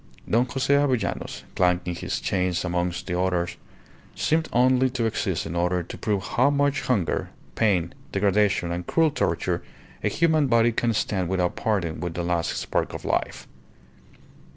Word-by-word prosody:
Don 120 +3 +2
Jose 135 +2 0
Avellanos, 130 -7 0
clanking 90 -1 +1
his - - -3
chains 90 -1 0
amongst 90 0 -1
the 90 -1 -2
others, 90 -2 0 0.6
seemed 160 +1 +1
only 130 +1 +4
to 125 -2 -1
exist 100 -6 -1
in 85 - -5
order 90 +1 +1
to - - -8
prove 100 -3 -1
how 125 +8 +2
much 145 0 +1
hunger, 105 -10 0 0.2
pain, 90 -6 +1 0.2
degradation, 100 -3 +2
and 85 0 -4
cruel 160 -2 +3
torture 85 - -1 0.4
a - - +2
human 160 -3 +2
body 115 -1 +4
can 115 0 0
stand 95 -4 -1
without 90 -2 0
parting 90 -7 -1
with 85 -2 -4
the 85 - -2
last 85 -1 -1
spark - - -2
of - - -7
life. - - -2
95 Hz, 155 wpm, -25 LUFS, 90-125 Hz, 0.6 s, only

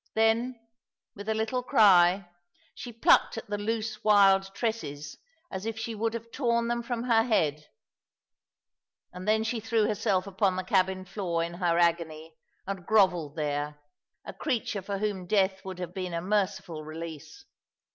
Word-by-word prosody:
Then, 230 +3 +2 0.6
with 205 +2 -7
a 220 - +1
little 220 +3 -1
cry, 190 -5 +5 0.5
she 245 - -8
plucked 230 0 +3
at 225 - -5
the 205 - 0
loose 220 0 -3
wild 195 -2 +5
tresses 155 - -4 0.3
as 190 +3 -5
if 225 -1 -3
she 225 +1 -4
would 225 +1 -2
have 230 0 -7
torn 235 -3 0
them 240 0 0
from 235 0 -3
her 230 -2 +4
head; 155 - 0 1.5
and 180 +2 -8
then 220 +1 +3
she 225 +1 -2
threw 225 -1 +1
herself 200 -3 0
upon 195 -1 0
the 185 - -2
cabin 185 0 +1
floor 175 -4 -2
in 170 +1 -5
her 175 -1 0
agony, 165 -2 0 0.3
and 190 -2 -6
grovelled 180 -9 +3
there, 145 -1 -3 0.5
a - - -7
creature 235 -7 -2
for 200 +1 -4
whom 195 -3 -3
death 190 -1 +1
would 190 -1 -7
have 180 -1 -6
been 185 -2 -4
a - - 0
merciful 190 -5 -1
release. 160 - -9
195 Hz, 160 wpm, -28 LUFS, 175-225 Hz, 1.5 s, cry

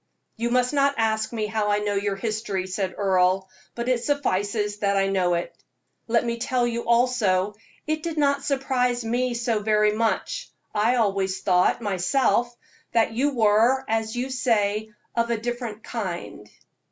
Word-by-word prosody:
"You 235 +1 -1
must 250 +2 +2
not 280 0 +3
ask 220 -1 0
me 220 -2 -2
how 210 -1 -1
I 205 - +3
know 210 0 -1
your 200 0 -1
history," 210 -2 -2
said 190 0 -3
Earle, 190 -1 +2 0.3
"but 235 0 -4
it 250 -2 +1
suffices 210 -7 0
that 200 -1 +1
I 195 - +3
know 185 -3 +1
it. 170 - -4 0.5
Let 235 +1 +2
me 235 0 -2
tell 245 0 +1
you 235 0 -3
also, 230 -5 +2 0.3
it 310 0 -1
did 330 -1 -4
not 280 -1 +2
surprise 250 -3 0
me 245 +2 0
so 235 -2 0
very 210 0 +3
much. 230 - -1 0.2
I 220 +4 +2
always 195 -4 0
thought, 180 +4 +2
myself, 235 +5 +1 0.4
that 225 -1 +2
you 275 +4 0
were, 230 +4 +3
as 220 0 -1
you 255 +2 -2
say, 220 -4 +1 0.3
'of 235 0 +1
a 235 - +1
different 235 -1 -5
kind.'" 180 - -5
225 Hz, 165 wpm, -24 LUFS, 205-245 Hz, 0.5 s, not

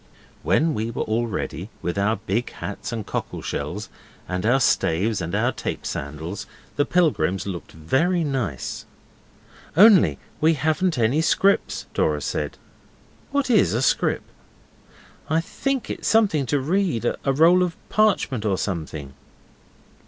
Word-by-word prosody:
When 160 0 +2
we 110 -2 -2
were 115 - -2
all 115 +2 0
ready, 105 - -4
with 85 0 -1
our 100 +2 +1
big 110 +3 -2
hats 105 +5 -6
and 115 -3 -4
cockle - - -4
shells, - - -4 0.4
and 90 +3 -2
our 130 +3 +4
staves 100 -2 +1
and 85 0 -3
our - - +2
tape - - -5
sandals, 80 +8 -5 0.3
the 145 - +2
pilgrims 95 - +1
looked 95 -4 -6
very 160 - +1
nice. 120 - -3 0.9
'Only 185 - +7 0.2
we 160 +1 +4
haven't 155 +3 0
any 120 +7 +2
scrips,' 195 +4 +2
Dora 75 -1 +1
said. 75 0 -3 0.7
'What 280 -2 0
is 215 - +4
a 120 - +1
scrip?' - - +1 1.1
'I 160 +2 +3
think 270 +8 -2
it's - - -4
something 195 - +3
to 145 - +1
read. 160 - 0
A 135 - 0
roll 165 +6 +5
of 175 -2 -1
parchment 200 - +2
or 100 -3 +1
something. 80 -8 -4
120 Hz, 140 wpm, -23 LUFS, -, 1.1 s, Only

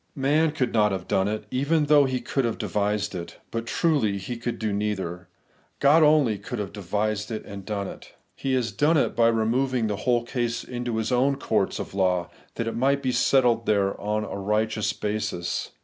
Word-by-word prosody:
Man 150 +4 +2
could 135 -6 -1
not 105 -2 +3
have 95 -2 -4
done 95 +1 +1
it, 105 +1 -2
even 150 +4 +1
though 145 -1 +5
he 130 -1 -1
could 135 - -1
have 115 -2 -1
devised 105 +1 -1
it. 85 -2 -7
But 115 0 -3
truly 140 - +1
he 110 +6 -5
could 120 0 -4
do 110 -2 -2
neither. 95 -4 -3 0.5
God 145 +3 +5
only 150 -9 +4
could 125 - -6
have 105 -2 -4
devised 105 +2 -2
and 100 -3 -6
done 100 -1 -3
it.. - - -11 0.2
He 135 - -2
has 120 -3 0
done 150 +11 +3
it - - +1
by 115 0 +4
removing 115 +2 +1
the 105 -2 -1
whole 120 +2 +1
case 120 -1 -2
into 120 -2 -4
His 110 +3 -1
own 130 +3 +3
courts - - 0
of - - -6
law, 90 -3 +1 0.2
that 115 - -2
it 115 - -3
might 140 +3 +1
be 130 - +1
settled 125 -3 +3
there 100 -2 +2
on 105 +1 -1
a 100 - -5
righteous 110 +1 0
basis. 105 -4 -3
115 Hz, 195 wpm, -25 LUFS, 105-130 Hz, 0.5 s, though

